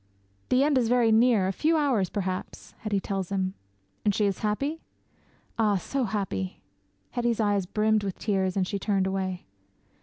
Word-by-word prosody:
'"The 255 Hz, +2 st, +4 dB
end 285 Hz, -2 st, +3 dB
is 235 Hz, -2 st, +1 dB
very 240 Hz, -2 st, +4 dB
near 220 Hz, -3 st, +4 dB
a -, -, +1 dB
few 320 Hz, -, +2 dB
hours 255 Hz, -, +2 dB
perhaps!" 185 Hz, -2 st, -4 dB
Hetty 210 Hz, -3 st, -1 dB
tells 195 Hz, -1 st, -3 dB
him. 190 Hz, -1 st, 0 dB, 0.5 s
'"And 205 Hz, -2 st, +2 dB
she 210 Hz, -, +2 dB
is 195 Hz, -2 st, 0 dB
happy?" 275 Hz, +10 st, -1 dB, 0.8 s
'"Ah, 210 Hz, -2 st, +3 dB
so 255 Hz, +8 st, -1 dB
happy!" 190 Hz, -, -3 dB, 0.5 s
Hetty's 240 Hz, -2 st, 0 dB
eyes 205 Hz, -3 st, +1 dB
brimmed 215 Hz, +1 st, +2 dB
with 195 Hz, -2 st, -3 dB
tears 190 Hz, -3 st, 0 dB
and 185 Hz, -2 st, +1 dB
she 200 Hz, -, -2 dB
turned 195 Hz, -1 st, +1 dB
away. 190 Hz, -1 st, -2 dB
205 Hz, 170 wpm, -27 LUFS, 190-230 Hz, 0.8 s, The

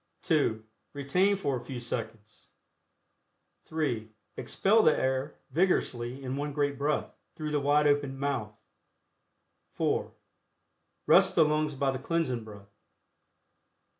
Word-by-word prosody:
(2) 145 Hz, -, +1 dB, 0.3 s
Retain 180 Hz, +9 st, +2 dB
for 140 Hz, -8 st, -1 dB
a 120 Hz, -, -9 dB
few 130 Hz, -3 st, -6 dB
seconds. 115 Hz, -3 st, -6 dB, 1.2 s
(3) 130 Hz, -9 st, -2 dB, 0.3 s
Expel 220 Hz, +3 st, +2 dB
the 155 Hz, -, +4 dB
air 130 Hz, +2 st, -1 dB, 0.2 s
vigorously 135 Hz, -7 st, 0 dB
in 130 Hz, 0 st, -3 dB
one 145 Hz, +1 st, -3 dB
great 145 Hz, -1 st, 0 dB
breath, 145 Hz, +2 st, -1 dB, 0.2 s
through 155 Hz, -1 st, -4 dB
the 150 Hz, -, +1 dB
wide 145 Hz, +1 st, +3 dB
opened 145 Hz, -2 st, +1 dB
mouth. 120 Hz, -7 st, -2 dB, 1.2 s
(4) -, -, 0 dB, 0.9 s
Rest -, -, +5 dB
the 160 Hz, -, +6 dB
lungs 150 Hz, -1 st, 0 dB
by 135 Hz, 0 st, +1 dB
the 130 Hz, -, -4 dB
Cleansing 135 Hz, -6 st, -1 dB
Breath. 100 Hz, -2 st, -13 dB
140 Hz, 120 wpm, -29 LUFS, 120-150 Hz, 1.2 s, the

